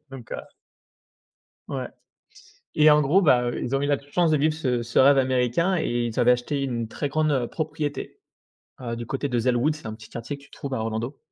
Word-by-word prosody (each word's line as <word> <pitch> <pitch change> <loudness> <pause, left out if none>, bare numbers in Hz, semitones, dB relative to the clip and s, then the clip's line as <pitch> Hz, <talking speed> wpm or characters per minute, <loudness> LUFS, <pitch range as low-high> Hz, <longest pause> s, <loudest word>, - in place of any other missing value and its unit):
Donc, 130 -4 -10
heu. - - -3 1.3
Ouais. - - -4 0.9
Et 155 0 +6
en 150 0 +6
gros, 160 +8 +3
bah, 125 -7 +4
heu, - - -4
ils 125 +2 -1
ont 135 - 0
eu - - 0
la 145 -1 +1
chance 155 +4 0
de 155 - +4
vivre 155 +2 +2
ce 125 -6 -1
ce 115 0 -4
rêve 135 +1 +6
américain 130 +8 +1
et 120 -5 -1
ils 115 +2 -4
avaient 125 0 +5
acheté 125 +4 -1
une 120 -4 -2
très 145 - -3
grande, 155 +1 +1
heu, 125 -4 0
propriété, 150 -2 -4 0.6
heu, 115 -2 -4
du 120 -1 -6
côté 140 +2 -2
de 120 -2 0
Zellwood, 125 +5 +2
c'est 155 - -11
un 110 - -5
petit 110 -1 -13
quartier 120 +5 -6
que - - -19
tu - - -22
trouves 140 - -7
à - - -2
Orlando. 115 +5 -3
135 Hz, 225 wpm, -25 LUFS, 120-150 Hz, 1.3 s, Et